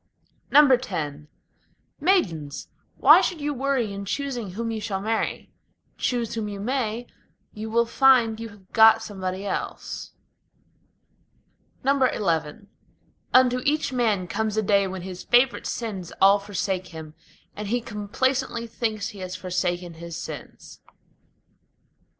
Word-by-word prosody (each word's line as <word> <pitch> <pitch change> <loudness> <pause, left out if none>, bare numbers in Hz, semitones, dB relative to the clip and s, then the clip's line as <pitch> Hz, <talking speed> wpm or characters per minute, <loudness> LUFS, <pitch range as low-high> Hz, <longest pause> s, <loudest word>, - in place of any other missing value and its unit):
X 250 - +4 0.8
Maidens! 170 - 0 0.3
why - - +8
should 350 - -1
you 295 0 -2
worry 265 -5 -1
in 200 0 -5
choosing 245 -4 -3
whom 230 +3 -3
you 220 -1 -4
shall 195 -2 -2
marry? 220 +3 -2 0.4
Choose 240 -3 -1
whom 220 -2 -3
you 200 -1 -6
may, 240 0 -2 0.5
you 215 +1 -6
will 235 +1 +3
find 235 -3 +4
you 230 0 -6
have 200 -3 -18
got 225 0 +7
somebody 190 -2 -5
else. - - -5 1.7
XI 205 - +1 0.6
Unto 250 -1 +5
each 300 -2 0
man 215 -7 +1
comes 215 +3 -2
a 220 - +2
day 200 -1 +3
when 190 -1 -6
his 185 -1 -7
favorite 245 +1 +3
sins 200 -7 -4
all 200 +1 +6
forsake 190 -2 -3
him, 160 -2 -9 0.4
And 210 0 -5
he 240 +4 +1
complacently 235 +3 -2
thinks 220 -3 -3
he 205 - -11
has 185 0 -5
forsaken 180 -1 -2
his 170 0 -8
sins. - - -9
215 Hz, 125 wpm, -25 LUFS, 190-245 Hz, 1.7 s, why